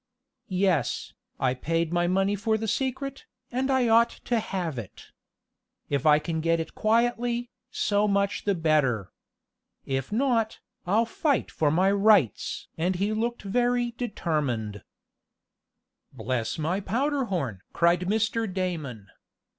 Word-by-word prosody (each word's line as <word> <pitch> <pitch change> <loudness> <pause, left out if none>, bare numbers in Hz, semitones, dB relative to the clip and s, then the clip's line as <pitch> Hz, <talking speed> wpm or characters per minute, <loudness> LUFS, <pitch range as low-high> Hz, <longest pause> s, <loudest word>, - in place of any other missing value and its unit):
"Yes, 185 -7 0 0.3
I 130 -1 +2
paid 165 +5 -1
my 175 0 +2
money 195 +3 +2
for 220 +2 0
the 220 +1 -3
secret, 265 +4 -2 0.2
and 260 +2 -1
I 260 -2 +3
ought 230 +1 +5
to 235 0 -2
have 180 - -3
it. 105 - -11 0.8
If 140 +1 +1
I 150 -1 +7
can 160 +1 -2
get 165 +1 +2
it 160 - -5
quietly, 240 +2 +1 0.2
so 205 0 +1
much 200 0 0
the 200 -1 +2
better. 145 - +1 0.7
If 135 +2 -2
not, 230 -2 +1 0.3
I'll 215 +5 +3
fight 280 +4 0
for 150 - +1
my 185 +6 +3
rights!" 200 - +3
and 180 +3 +1
he 200 +4 0
looked 235 +2 -2
very 240 +3 +1
determined. 145 - -2 1.3
"Bless 120 -2 -2
my 165 +5 0
powder 265 +7 0
horn!" 135 - -3
cried 170 0 +3
Mr. 220 +1 0
Damon. 160 - -3
195 Hz, 130 wpm, -27 LUFS, 160-230 Hz, 1.3 s, I